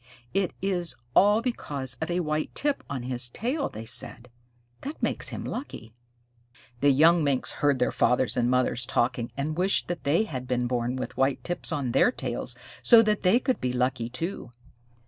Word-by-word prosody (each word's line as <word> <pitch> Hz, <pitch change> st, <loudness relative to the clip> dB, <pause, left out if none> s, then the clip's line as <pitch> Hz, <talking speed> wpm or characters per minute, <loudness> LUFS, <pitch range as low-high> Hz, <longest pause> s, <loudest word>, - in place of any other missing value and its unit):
"It 195 Hz, -1 st, 0 dB
is 175 Hz, -8 st, +2 dB, 0.2 s
all 205 Hz, +3 st, +5 dB
because 140 Hz, -, -3 dB
of 160 Hz, -, -2 dB
a 175 Hz, +1 st, 0 dB
white 155 Hz, -1 st, -2 dB
tip 290 Hz, -1 st, 0 dB
on 135 Hz, -3 st, -4 dB
his 125 Hz, -1 st, 0 dB
tail," 260 Hz, -, -2 dB
they 110 Hz, +1 st, -8 dB
said. 125 Hz, 0 st, 0 dB, 0.5 s
"That 290 Hz, +3 st, -6 dB
makes -, -, -1 dB
him -, -, -6 dB
lucky." 115 Hz, -, -7 dB, 0.9 s
The 145 Hz, -, +4 dB
young 160 Hz, +4 st, +5 dB
Minks 140 Hz, -3 st, 0 dB
heard 145 Hz, -2 st, +1 dB
their 125 Hz, -, +1 dB
fathers 125 Hz, 0 st, +2 dB
and 120 Hz, -1 st, +1 dB
mothers 125 Hz, -1 st, +1 dB
talking, 120 Hz, -2 st, 0 dB
and 150 Hz, +2 st, -2 dB
wished 190 Hz, +2 st, +2 dB
that 175 Hz, -1 st, -4 dB
they 155 Hz, +9 st, +2 dB
had 130 Hz, -, -6 dB
been 125 Hz, -1 st, 0 dB
born 120 Hz, 0 st, -1 dB
with 130 Hz, -, -5 dB
white 135 Hz, 0 st, +1 dB
tips 175 Hz, 0 st, -3 dB
on 140 Hz, -6 st, -1 dB
their 245 Hz, -, +4 dB
tails -, -, -4 dB, 0.3 s
so 230 Hz, -2 st, +7 dB
that 215 Hz, -1 st, +1 dB
they 195 Hz, +6 st, +4 dB
could 260 Hz, 0 st, -1 dB
be 125 Hz, -1 st, -1 dB
lucky 125 Hz, -1 st, -1 dB
too. 135 Hz, +1 st, -4 dB
140 Hz, 185 wpm, -26 LUFS, 125-185 Hz, 0.9 s, so